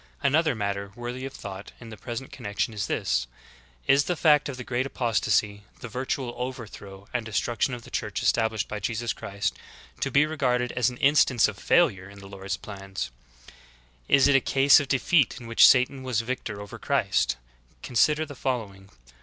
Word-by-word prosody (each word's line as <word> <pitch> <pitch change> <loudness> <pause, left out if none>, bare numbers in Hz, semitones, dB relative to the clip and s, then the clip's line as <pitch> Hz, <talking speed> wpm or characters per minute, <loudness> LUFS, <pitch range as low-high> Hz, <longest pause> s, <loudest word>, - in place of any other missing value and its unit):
"^ - - -28 0.2
11. 140 0 +2
Another 160 -4 +3
matter 100 -1 -3
worthy 120 +2 -5
of 135 - -11
thought 100 -1 -8
in 115 - -11
the - - -7
present 120 +5 -7
connection 105 +3 -3
is 105 - -3
this: - - 0 0.6
Is 140 +1 +4
the 180 - 0
fact 150 -3 +4
of 130 - -6
the 125 - -6
great 125 +2 -1
apostasy, 110 -5 0
— - - -29
the 125 - -6
virtual 125 +1 -3
overthrow 110 -6 -7
and 125 -2 -1
destruction 120 +4 -1
of 120 - -11
the - - -14
Church - - -3
established 110 -2 +1
by 105 - -5
Jesus 115 +3 -2
Christ, 100 -3 -3 0.2
— 60 0 -22
to - - 0
be 140 +2 +4
regarded 125 -5 0
as 125 -1 +1
an 125 - -9
instance 135 -4 +4
of - - -7
failure 100 - +2
in 100 - -14
the 100 - -12
Lord's 100 0 -5
plans? 95 - -6 1.0
Is 140 - +6
it 140 - +4
a 135 - +5
case 135 +2 +5
of 145 - -3
defeat 135 +1 +2
in 120 - -11
which 115 0 +7
Satan 130 +1 +3
was 125 -3 -1
victor 115 -3 -4
over 100 0 -9
Christ? - - +1 0.5
Consider 150 +6 +2
the 145 - -9
following. 105 -8 -4
120 Hz, 195 wpm, -26 LUFS, 100-135 Hz, 1.0 s, which